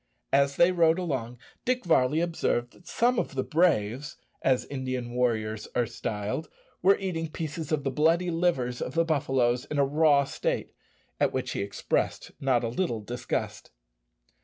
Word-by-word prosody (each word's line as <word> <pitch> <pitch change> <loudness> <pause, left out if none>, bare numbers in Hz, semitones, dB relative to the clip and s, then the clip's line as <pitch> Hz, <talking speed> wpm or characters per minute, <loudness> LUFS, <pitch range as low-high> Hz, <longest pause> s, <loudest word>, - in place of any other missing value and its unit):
As 140 0 +3
they 175 +1 +5
rode 165 -2 +4
along, 130 -9 -3 0.3
Dick 250 -3 0
Varley 155 -2 +3
observed 145 -8 0
that 175 - -20
some 245 +1 +2
of - - -3
the 130 - 0
"braves," 145 - +1 0.2
as 130 -1 +2
Indian 130 -3 -4
warriors 110 -3 0
are 120 - +2
styled, 105 +8 -4 0.3
were 195 +2 +5
eating 165 -5 -3
pieces 155 0 -5
of 150 -3 0
the 135 - -1
bloody 165 +5 +2
livers 150 -8 0
of 125 - -4
the 165 0 +3
buffaloes 135 -5 +1
in 150 - -4
a 140 - +4
raw 145 0 +4
state, 135 - -3 0.5
at - - +3
which - - -2
he - - -2
expressed 100 0 -2
not 130 -3 +2
a - - 0
little 120 -4 -1
disgust. 120 +4 -4
140 Hz, 160 wpm, -28 LUFS, 125-165 Hz, 0.5 s, they